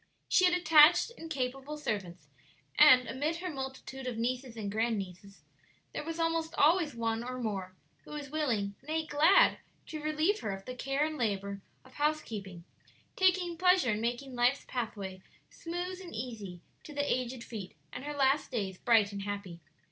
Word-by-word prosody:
She 370 - +5
had 360 0 +4
attached 330 +3 +6
and 325 - -9
capable 270 +1 -3
servants, 185 - -4 0.5
and 250 -1 +8
amid 290 +7 -1
her 355 +1 -4
multitude 265 -1 -6
of 245 -3 -3
nieces 245 +1 -2
and 205 -2 -3
grand 225 +1 0
nieces, 195 +1 -8 0.5
there - - -4
was 330 +2 -5
almost 330 0 0
always 315 -1 +3
one 230 0 -1
or 255 +1 -5
more 195 -6 -4 0.3
who - - -16
was 290 -2 -6
willing 235 -10 0
nay, 315 +3 -2
glad, 310 +6 +5 0.3
to 310 -1 -6
relieve 310 +7 +1
her - - -4
of 195 0 -8
the 255 - -5
care 275 +3 0
and 310 -1 -4
labor 200 -3 -2 0.2
of 260 - -17
housekeeping, 220 - -2 0.5
taking 360 -2 +2
pleasure 360 -8 +4
in 210 +1 -1
making 245 +3 -2
life's 245 +3 +2
pathway 200 -6 -4 0.3
smooth 355 +2 -5
and 355 -8 -9
easy 215 -7 -6 0.2
to 300 - -10
the 285 0 0
aged 250 -1 -1
feet, 210 -6 -8 0.2
and 255 - -6
her 295 0 -5
last 275 +1 +2
days 195 -7 -3
bright 220 -4 +4
and 200 0 -5
happy. 200 -4 -5
255 Hz, 170 wpm, -31 LUFS, 215-310 Hz, 0.5 s, and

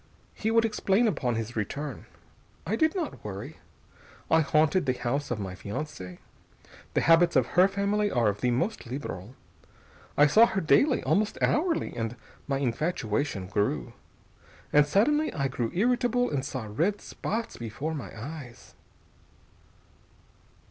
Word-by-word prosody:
He 220 - -2
would 225 0 +4
explain 210 +1 +2
upon 125 - 0
his 115 +1 -4
return. 135 +5 -4 0.6
I 200 - 0
did 315 - +2
not 335 -8 -4
worry. 100 -2 -7 0.7
I 160 - +6
haunted 155 +2 +2
the 130 - +2
house 140 +4 -2
of 120 - -2
my 95 -2 -4
fiancée. 100 - -6 0.8
The - - +3
habits 165 0 +5
of 130 -3 +4
her 180 +2 +5
family 200 +1 0
are 120 - +2
of 105 0 -1
the 125 - +2
most 130 - -1
liberal. 120 -4 -6 0.8
I 145 - +7
saw 220 +11 +6
her 195 - -1
daily, 260 - +3
almost 210 +1 +1
hourly, 330 - +1
and 115 0 -3 0.3
my 135 -2 0
infatuation 125 - -1
grew. 90 - -1 0.8
And 145 0 +6
suddenly 295 - +2
I 140 -3 0
grew 120 -3 -2
irritable 245 +4 +1
and 140 -3 -1
saw 130 -5 -4
red 165 - 0
spots 225 +2 -4
before 120 +8 -4
my 145 -5 -5
eyes.... 135 -1 -9
145 Hz, 140 wpm, -28 LUFS, -, 0.8 s, I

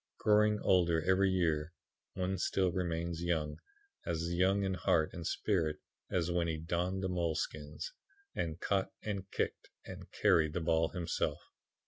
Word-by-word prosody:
Growing 105 0 +4
older 85 -3 +3
every 95 +1 +4
year, 85 -3 +1 0.4
one 95 +1 -1
still 95 0 +1
remains 85 -1 -2
young 80 -3 -1 0.5
as 85 +1 -2
young 95 +3 +3
in 95 -1 0
heart 80 -3 +2
and 85 -2 -4
spirit 85 -7 0 0.3
as 90 -1 0
when 85 -1 +1
he 80 -1 -1
donned 90 +4 -1
the - - +1
moleskins, 80 - -3 0.4
and 80 -1 -3
caught 95 0 0
and 100 -2 -4
kicked - - -2 0.2
and - - -9
carried 80 -2 +3
the 90 - 0
ball 80 -1 +2
himself. 85 -3 -2
85 Hz, 145 wpm, -33 LUFS, 80-95 Hz, 0.5 s, Growing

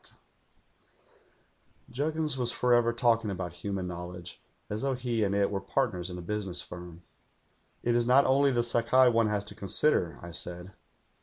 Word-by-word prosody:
lU - - -13
THE - - -15
GHOUL - - -31
"Juggins 155 +2 -1
was 125 -2 0
forever 120 -1 +3
talking 115 -2 +2
about 90 -3 -4
human 95 +1 -4
knowl 90 0 -6
edge, 85 -1 -10 0.3
as 105 +1 -4
though 135 -1 0
he 120 -3 -1
and 100 -1 0
it 100 -1 +2
were 100 -1 -2
partners 95 -4 -1
in 90 - -6
a 90 - -7
business 95 -2 -3
firm. 90 -1 -9 0.8
'"It 120 - +2
is 120 0 +2
not 130 +3 +6
only 140 +1 +4
the 120 -2 +1
Sakai 120 +2 +4
one 115 -2 +3
has 105 -1 -1
to 105 - -8
consider,' 100 - +1
I 85 - -7
said. 90 +2 -6
105 Hz, 180 wpm, -29 LUFS, 90-125 Hz, 0.8 s, not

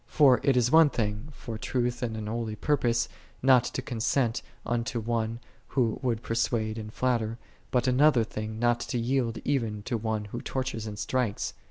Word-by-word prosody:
For 135 -5 +5
it 135 -2 +3
is 120 0 +3
one 160 -1 +7
thing, 105 0 -2
for 115 -5 -7
truth 120 0 -1
and 115 -3 -2
an 110 - -4
holy 110 0 -3
purpose, 120 -2 +1 0.4
not 130 -2 +6
to 130 - -3
consent 120 0 0 0.2
unto 115 0 -1
one 115 0 -1 0.3
who 120 -5 0
would 120 -4 -1
persuade 115 -1 0
and 105 -1 -7
flatter, 115 -2 0 0.3
but 125 -1 +1
another 130 -1 +5
thing 110 0 -5
not 120 +1 +2
to 125 - -3
yield 120 -1 0
even 115 -7 -1
to 120 +1 -1
one 110 -1 -2
who 120 - -3
tortures 130 -4 -3
and 105 -1 -6
strikes. 120 -1 -1
120 Hz, 175 wpm, -28 LUFS, 110-125 Hz, 0.4 s, one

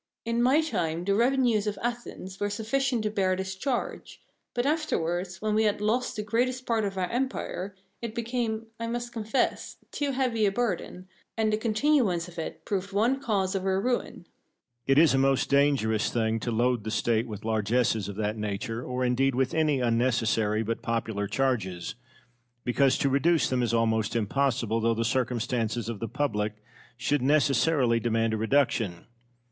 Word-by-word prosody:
In 230 +1 0
my 265 +6 +4
time 175 - -2
the 200 - +2
revenues 235 -2 +2
of 205 -1 -2
Athens 235 -5 -5
were 205 - 0
sufficient 230 +3 0
to 210 - -1
bear 190 -3 +1
this 190 0 -4
charge; 245 +5 -3 0.4
but 240 +1 0
afterwards, 185 - -1
when 215 -1 +1
we 220 +1 +3
had 205 -1 +1
lost 225 +4 0
the 210 - -3
greatest 250 +4 0
part 225 -2 +1
of 195 -1 -4
our 185 -1 0
empire, 235 -6 -3 0.3
it 230 -1 -5
became, 230 -2 -2
I 230 - -3
must 240 +1 -4
confess, 225 +3 -1
too 285 -2 -1
heavy 245 -5 +1
a - - +2
burden, 190 -4 -2 0.3
and 220 -1 +1
the - - +2
continuance 220 - +1
of 175 -1 -9
it 160 - -6
proved 200 -1 -2
one 235 +7 +1
cause 200 -6 0
of 195 -1 -2
our 190 0 +1
ruin. 245 -4 -2
Cosmo. - - -36 0.6
It 135 0 +4
is 155 -2 +6
a 135 - +3
most 135 0 +2
dangerous 140 -6 +3
thing 115 -1 0
to 120 - -3
load 120 0 +1
the 110 - -4
State 115 +1 +1
with 110 -1 -7
largesses 110 -1 +1
of 100 - -6
that 105 +1 -2
nature, 105 +3 -3
or 125 0 -2
indeed 130 +1 +2
with 130 0 +1
any 155 -4 +2
unnecessary 115 -3 +1
but 115 +1 -3
popular 110 -3 -2
charges, 100 -8 -1 0.7
because 130 +2 +3
to - - +1
reduce 155 +5 +3
them 130 -1 0
is 120 - 0
almost 110 -2 +1
impossible, 115 0 0
though 115 0 +2
the 115 +1 -1
circumstances 120 -2 -1
of 115 -3 -4
the 115 - -3
public 110 -6 -1 0.4
should 130 +4 0
necessarily 140 -3 +3
demand 115 -1 +1
a - - 0
reduction. 110 -6 +1
155 Hz, 175 wpm, -27 LUFS, -, 0.7 s, is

